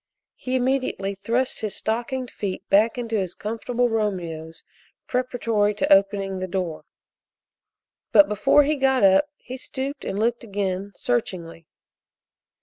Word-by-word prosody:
He 255 0 -3
immediately 255 -6 0
thrust 230 +6 -1
his 215 -2 -3
stockinged 240 +3 -2
feet 195 -3 -5
back 220 +5 +4
in 240 -1 -3
his 195 -6 -2
comfortable 235 +3 -1
Romeos 175 -8 -3 0.4
preparatory 230 -5 0
to 200 - +4
opening 195 -1 +2
the 185 - -3
door, 180 -4 -3 1.3
but 300 - +7
before 210 +8 +4
he 300 +1 0
got 265 -3 +2
up 195 +9 +5
he 255 - -8
stooped 270 +2 -5
and 195 - -3
looked 235 +3 0
again, 200 -2 -3
searchingly. 175 -9 -3
215 Hz, 130 wpm, -24 LUFS, 195-250 Hz, 1.3 s, but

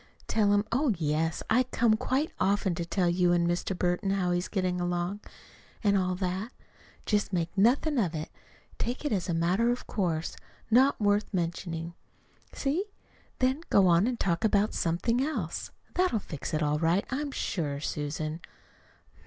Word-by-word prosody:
Tell 210 -2 +2
him, 205 +1 +3
oh, 250 -2 +2
yes, 160 +1 0
I 230 +3 +4
come 235 -3 +2
quite 265 +7 0
often 195 -1 +2
to 170 0 -3
tell 180 0 +1
you 175 0 +3
and 170 -1 +2
Mr. 175 +2 -1
Burton 180 +3 0
how 190 -2 +1
he's 175 0 0
getting 185 -3 -1
along, 175 +3 -1 0.6
and 200 -1 +4
all 185 -1 +1
that. 185 +4 -3 0.5
Just 205 -2 +1
make 170 -2 -1
nothing 255 +8 +3
of 175 -7 0
it 155 0 -5 0.5
take 245 +5 -3
it 295 - 0
as 190 -4 -1
a 170 - +1
matter 180 +8 +2
of 245 +1 -1
course, 165 -5 -2 0.4
not 265 +5 +5
worth 205 0 +2
mentioning. 170 -2 -3 0.6
See? 300 +8 -1 0.5
Then 260 +4 +1
go 195 - +5
on 175 +4 +4
and 245 -2 -2
talk 170 -3 0
about 210 -1 +2
something 180 +9 0
else. 230 - -3 0.2
That'll 365 -9 +2
fix 155 -8 -6
it 155 - 0
all 150 0 +1
right, 170 +4 +2
I'm 285 +2 -2
sure, 150 - -2
Susan." 155 +2 -3
190 Hz, 165 wpm, -29 LUFS, 170-225 Hz, 0.6 s, not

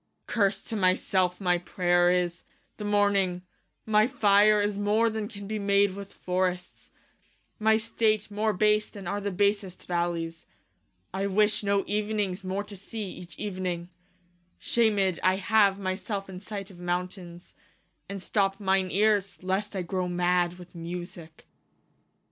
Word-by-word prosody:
Klaius. - - -7
Curse 200 -3 +2
to 225 - -5
my 185 -3 +4
selfe 180 -2 0
my 180 -3 +2
prayer 175 0 +2
is, 180 -1 0 0.3
the 210 - -6
morning: 200 -3 +2 0.4
My 215 0 +4
fire 210 -4 +4
is 205 0 0
more, 210 +3 +2
then 215 -1 -3
can 200 -1 -9
be 215 +1 -3
made 200 0 +3
with 200 0 -8
forrests; 180 0 -3 0.7
My 220 0 +4
state 220 -2 0
more 215 +1 +1
base, 210 +2 +2
then 200 -3 -10
are 200 +4 -2
the 200 - -1
basest 200 -1 0
vallies: 170 -2 -2 0.7
I 195 +1 -1
wish 210 +2 +2
no 200 -1 +1
evenings 205 -2 -1
more 190 +2 -2
to 205 0 -10
see, 200 +1 -6
each 175 -4 -11
evening 185 -4 -3 0.4
\ 175 0 -40 0.2
Shamed 205 -6 +3
I 185 0 +3
have 200 0 +3
my 185 -2 -1
selfe 195 -1 -5
in 185 -1 -7
sight 200 -1 -7
of 175 - -14
mountaines, 175 0 -4 0.6
And 200 - -4
stoppe 195 0 0
mine 190 -2 +1
eares, 200 -2 +1
lest 195 +3 -1
I 185 - -1
growe 180 +1 -2
mad 175 0 +1
with 180 -1 -13
Musicke 170 -1 -8
195 Hz, 155 wpm, -27 LUFS, 180-205 Hz, 0.7 s, my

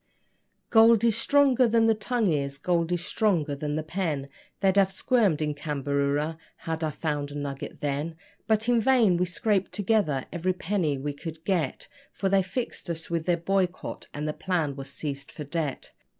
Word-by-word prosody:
Gold 225 0 +6
is 230 -3 +4
stronger 265 0 +4
than 225 0 +3
the 225 - +5
tongue 220 -3 0
is 140 -1 -2
gold 170 +3 0
is 175 0 -1
stronger 170 -10 +1
than 150 +1 -3
the 155 - -2
pen: 155 -5 -2 0.3
They'd 195 -1 +3
have 195 -1 +4
squirmed 195 - +2
in 150 -1 -1
Cambaroora 145 +1 -1 0.2
had 160 0 -4
I 155 - +1
found 150 -1 -3
a 145 - -9
nugget 140 -1 -5
then; 145 +3 -2 0.3
But 220 +1 +2
in 240 -2 +4
vain 230 -6 +4
we 180 - +2
scraped 195 +2 0
together 200 - +1
every 180 +2 0
penny 175 -5 -1
we 145 +2 -3
could 160 +2 -8
get, 175 -9 -1 0.3
For 195 - -1
they 195 0 +4
fixed 190 +1 -4
us 165 0 -4
with 165 0 -1
their 175 -1 +3
boycott, 185 +1 -2
and 150 +1 -4
the 150 - -1
plant 165 -7 -1
was 135 -1 -7
seized 140 -1 -6
for 150 - -7
debt. 145 -1 -3
170 Hz, 180 wpm, -27 LUFS, 145-200 Hz, 0.3 s, Gold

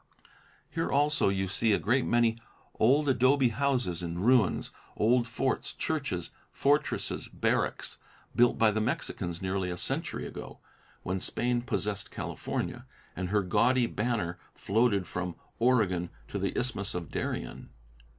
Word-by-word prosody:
Here 165 - -1
also 145 -5 +3
you 95 0 0
see 110 +4 +2
a - - +4
great 125 +4 +1
many 115 -1 +3 0.4
old 140 +6 +4
adobe 130 0 +4
houses 125 -9 0
in 85 -1 -4
ruins, 115 +1 +3 0.3
old 120 +3 +3
forts, 130 +3 -1
churches, 140 - -2 0.2
fortresses, 145 +2 0
barracks, - - -1 0.4
built 120 0 +4
by 110 -1 +5
the 110 +1 0
Mexicans 90 -6 -2
nearly 95 -1 -1
a 90 - -4
century - - -2
ago, - - -8 0.5
when 95 +1 -1
Spain 120 +5 -1
possessed 105 -4 -2
California, - - -4 0.3
and 90 +1 -3
her 105 0 +2
gaudy 120 +6 +3
banner 105 -7 -1 0.2
floated 100 -2 +2
from 90 0 -4 0.2
Oregon 105 -8 +2 0.2
to - - -3
the - - -2
Isthmus 110 -6 -2
of 85 -3 -5
Darien. - - -4
110 Hz, 135 wpm, -30 LUFS, 95-125 Hz, 0.5 s, by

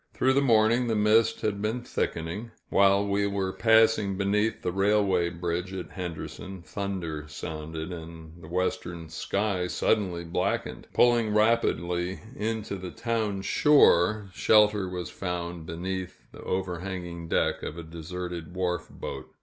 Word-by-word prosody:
Through 130 +1 +3
the 140 - +3
morning, 115 -1 +4
the 115 - +1
mist 110 +2 +3
had 100 -2 -1
been 110 +3 -1
thickening. 85 +7 -3 0.2
While 100 0 +4
we 100 0 +1
were 95 -1 -1
passing 110 -3 +4
beneath 105 +3 0
the 90 - 0
railway 95 -2 +2
bridge 85 +1 -3
at 95 -2 -6
Henderson, 90 +1 -6
thunder 90 -7 -4
sounded, 80 +2 -6
and 80 0 -10
the 80 - -11
western 85 -1 -2
sky 95 +2 -1
suddenly 90 -3 0
blackened. 85 - -2
Pulling 120 -3 +3
rapidly 90 -5 +1 0.2
in 110 -2 -2
to 100 - -5
the 90 -1 -6
town 110 -3 -2
shore, 105 - +4
shelter 105 -2 +4
was 90 -2 -5
found 85 -3 -4
beneath 95 +2 -5
the - - -12
overhanging 90 -2 -4
deck - - +1
of 80 - -5
a 85 - -6
deserted 85 +1 -6
wharf 90 -2 -1
boat. - - -7
95 Hz, 140 wpm, -27 LUFS, 85-105 Hz, 0.2 s, morning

